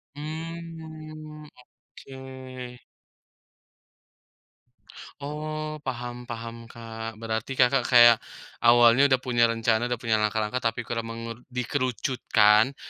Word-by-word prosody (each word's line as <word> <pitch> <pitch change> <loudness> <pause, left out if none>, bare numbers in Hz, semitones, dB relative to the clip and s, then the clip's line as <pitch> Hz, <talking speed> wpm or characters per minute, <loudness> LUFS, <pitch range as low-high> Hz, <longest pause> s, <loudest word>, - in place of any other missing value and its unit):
Mmm, 155 -1 -8 0.4
oke. 130 -2 -10 2.4
Oh, 155 +1 -5
paham 120 -1 -5
paham, 115 0 -7
Kak. 115 -1 -8
Berarti, 110 +3 -3
Kakak, 125 0 +4
kayak 120 -2 +8 0.5
awalnya 120 +3 +7
udah 130 -1 +3
punya 120 -2 +2
rencana, 115 +1 +1
udah 120 - -1
punya 110 -1 +2
langkah-langkah, 105 +3 0
tapi 115 +2 -3
kurang 115 0 -4
mengeru 115 0 -7 0.2
dikerucutkan, 125 -2 +2
125 Hz, 95 wpm, -26 LUFS, 115-140 Hz, 2.4 s, kayak